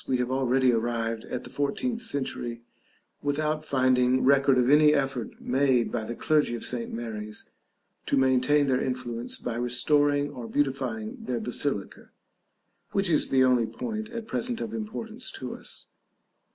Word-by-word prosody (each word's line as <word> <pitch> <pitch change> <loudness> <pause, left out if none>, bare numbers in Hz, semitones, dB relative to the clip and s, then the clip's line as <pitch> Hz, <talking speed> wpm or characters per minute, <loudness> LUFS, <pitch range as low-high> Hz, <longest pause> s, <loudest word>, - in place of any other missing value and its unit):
We 130 - +1
have 125 0 -1
already 130 -1 +3
arrived 115 -1 -1
at 125 - -5
the 125 - -11
fourteenth 225 - -1
century 130 - -2 0.6
without 155 +2 -1
finding 130 -2 +2
record 140 -1 +4
of 125 -1 +3
any 150 +2 +6
effort 135 -5 -2
made 130 -2 +2
by 115 -2 -2
the 120 - -5
clergy 150 -4 +2
of 115 - -6
St. 120 -2 -1
Mary's 110 -2 -6 0.6
to - - +2
maintain 130 +2 +3
their 130 -1 +1
influence 125 -2 -3
by 115 -1 -4
restoring 145 +4 +2
or 120 -2 -7
beautifying 130 -5 -1
their 125 -2 -2
basilica; 120 -4 -2 0.8
which 195 -3 +1
is 155 - +2
the 130 -1 +4
only 125 -3 +3
point 220 - -5
at 230 -1 -6
present 235 +1 -2
of 225 -1 -4
importance 225 +2 -5
to - - -6
us. - - -9
130 Hz, 150 wpm, -27 LUFS, 120-145 Hz, 0.8 s, any